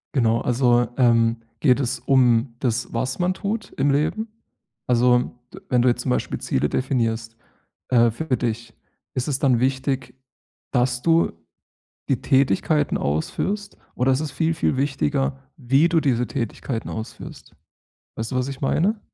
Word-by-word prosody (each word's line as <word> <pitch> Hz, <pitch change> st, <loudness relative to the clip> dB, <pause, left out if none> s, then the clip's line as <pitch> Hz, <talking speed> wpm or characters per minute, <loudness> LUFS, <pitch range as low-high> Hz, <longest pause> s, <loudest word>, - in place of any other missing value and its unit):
Genau. 115 Hz, -3 st, +3 dB
Also, 120 Hz, 0 st, +2 dB
ähm, 115 Hz, -2 st, +3 dB, 0.2 s
geht 130 Hz, -3 st, +4 dB
es 125 Hz, -1 st, -2 dB
um 125 Hz, -2 st, +3 dB
das, 125 Hz, -1 st, -2 dB
was 130 Hz, +5 st, -2 dB
man 180 Hz, +1 st, +1 dB
tut 210 Hz, +2 st, -4 dB
im 145 Hz, -, +2 dB
Leben? 155 Hz, +11 st, 0 dB, 0.6 s
Also, 125 Hz, 0 st, +3 dB, 0.4 s
wenn 125 Hz, -1 st, +2 dB
du 125 Hz, -, +4 dB
jetzt 120 Hz, 0 st, -1 dB
zum 130 Hz, -, -2 dB
Beispiel -, -, -1 dB
Ziele 70 Hz, +3 st, 0 dB
definierst, 115 Hz, -3 st, -1 dB, 0.5 s
äh, 120 Hz, -2 st, +4 dB
für 130 Hz, +1 st, -2 dB
dich, 115 Hz, -1 st, -3 dB, 0.4 s
ist 130 Hz, -, -2 dB
es 140 Hz, -3 st, -1 dB
dann 130 Hz, -5 st, +3 dB
wichtig, 130 Hz, -1 st, -1 dB, 0.6 s
dass 125 Hz, -1 st, +1 dB
du 165 Hz, -, +3 dB, 0.8 s
die 130 Hz, -, +1 dB
Tätigkeiten 140 Hz, +3 st, +2 dB
ausführst? 195 Hz, -, -2 dB, 0.2 s
Oder 130 Hz, +2 st, +2 dB
ist 130 Hz, -, 0 dB
es 155 Hz, -2 st, -4 dB
viel, 165 Hz, +2 st, 0 dB
viel 155 Hz, -, 0 dB
wichtiger, 140 Hz, 0 st, 0 dB, 0.2 s
wie 135 Hz, +5 st, +3 dB
du 165 Hz, -1 st, +3 dB
diese 125 Hz, -5 st, +1 dB
Tätigkeiten 115 Hz, +1 st, -4 dB
ausführst? 110 Hz, 0 st, -8 dB, 0.6 s
Weißt 110 Hz, 0 st, -4 dB
du, 130 Hz, -, -3 dB
was 125 Hz, +1 st, 0 dB
ich 135 Hz, -1 st, -6 dB
meine? 195 Hz, +10 st, +1 dB
130 Hz, 150 wpm, -23 LUFS, 120-140 Hz, 0.8 s, geht